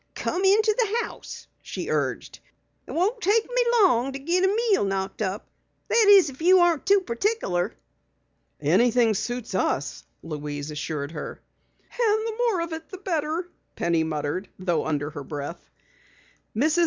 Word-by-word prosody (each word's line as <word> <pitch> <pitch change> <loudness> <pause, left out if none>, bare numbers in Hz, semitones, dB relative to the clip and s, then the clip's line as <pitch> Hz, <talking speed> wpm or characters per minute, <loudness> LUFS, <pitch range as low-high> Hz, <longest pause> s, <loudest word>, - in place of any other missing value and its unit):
"Come 370 - -2
into 425 +2 +4
the 460 0 +1
house," - - -10 0.2
she - - -5
urged. - - -2 0.5
"It - - -8
won't 415 +8 0
take 430 +4 +3
me - - +1 0.2
long 265 -7 +3
to 270 - -5
git 340 +7 0
a - - +5
meal 425 - +2
knocked 195 +1 -2
up. 200 +1 -3 0.4
That 465 -2 +4
is, 385 -8 +7
if 265 - -14
you 365 +2 +6
ain't 340 -1 0
too 400 0 +5
particular." 235 - -1 0.8
"Anything 240 -2 +3
suits 240 +2 -4
us," 145 -6 -1 0.2
Louise 150 -1 -5
assured 150 -1 -4
her. 155 -3 -7 0.4
"And 440 -2 0
the 445 - -4
more 460 -6 +1
of 335 -1 -4
it, 320 0 -7
the 380 - -8
better," 335 -2 -2 0.3
Penny 170 -1 +1
muttered, 160 +4 -3
though 175 -4 -1
under 150 -1 -1
her 145 -2 -7
breath. 145 +4 -7 0.9
Mrs. 305 +9 +2
290 Hz, 155 wpm, -25 LUFS, -, 0.9 s, is